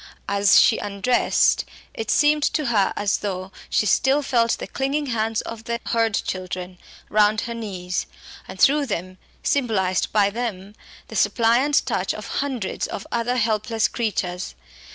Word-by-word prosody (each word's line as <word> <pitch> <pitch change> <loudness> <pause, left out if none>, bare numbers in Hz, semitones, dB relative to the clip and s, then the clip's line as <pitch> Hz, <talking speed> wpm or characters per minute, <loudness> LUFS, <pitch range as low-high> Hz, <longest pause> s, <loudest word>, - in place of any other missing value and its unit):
As 200 -1 +5
she 225 - +4
undressed, 205 +5 +2 0.3
it 220 -1 -5
seemed 300 0 +3
to 305 - 0
her 200 -3 +3
as 205 -1 0
though 190 -2 -4 0.2
she - - +2
still 270 +7 +3
felt 235 -4 +2
the - - -5
clinging 275 +2 -2
hands 225 -3 -1
of 225 -1 -8
the 235 0 -2
Hurd 225 -2 +1
children 185 -1 -4 0.3
round 210 0 +3
her 235 - -4
knees, 190 -5 -4 0.4
and - - -10
through 285 0 +4
them, 185 -3 -4 0.2
symbolised 210 -9 +1
by 200 -1 +3
them, 210 -4 -4 0.4
the 220 - -8
suppliant 235 +7 +3
touch - - -1
of - - -7 0.2
hundreds 260 -8 -3
of - - -6
other 235 +1 0
helpless 220 -1 +1
creatures. 185 -6 -3
220 Hz, 150 wpm, -23 LUFS, 200-245 Hz, 0.4 s, As